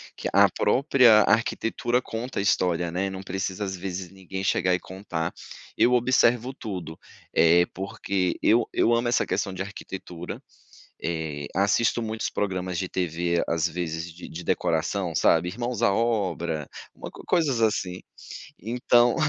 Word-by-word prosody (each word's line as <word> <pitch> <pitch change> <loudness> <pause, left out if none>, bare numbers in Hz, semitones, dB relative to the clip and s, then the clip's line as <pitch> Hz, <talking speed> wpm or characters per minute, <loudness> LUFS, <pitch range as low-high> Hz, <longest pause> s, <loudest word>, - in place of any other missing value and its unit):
que - - -4
a - - +6
própria 125 -5 +5
arquitetura 115 +2 +1
conta 120 0 -5
a - - +1
história, 90 -3 +1
né, 95 +3 -1
não 95 0 -7
precisa, 95 +1 -3
às 95 -1 -3
vezes, 90 -1 -5
ninguém 95 0 -7
chegar 90 -1 +2
e - - -3
contar. 90 -4 -5 0.4
Eu 125 - +4
observo 125 0 +3
tudo, 90 - -7 0.3
eh, 85 +1 +5
porque 95 -1 -2
eu 115 +2 +4
eu 120 - +3
amo 120 +1 +1
essa 120 - +2
questão 95 0 -2
de 95 - -5
arquitetura, 95 -3 -7 0.6
eh, 80 -3 -3
assisto 105 +4 +2
muitos 110 -2 -3
programas 95 -3 -2
de 95 0 -2
TV, 85 -1 -1
às 80 -1 +1
vezes, 85 0 -4
de 85 - -10
de 85 +2 -8
decoração, 85 +3 0
sabe? 80 +3 +3
Irmãos 120 +4 -3
à 115 - +4
Obra, 90 -9 -1 0.3
uma - - -8
coisas 150 -9 0
assim. 95 -5 0 0.6
Então, 120 +2 +3
95 Hz, 145 wpm, -25 LUFS, 85-115 Hz, 0.6 s, a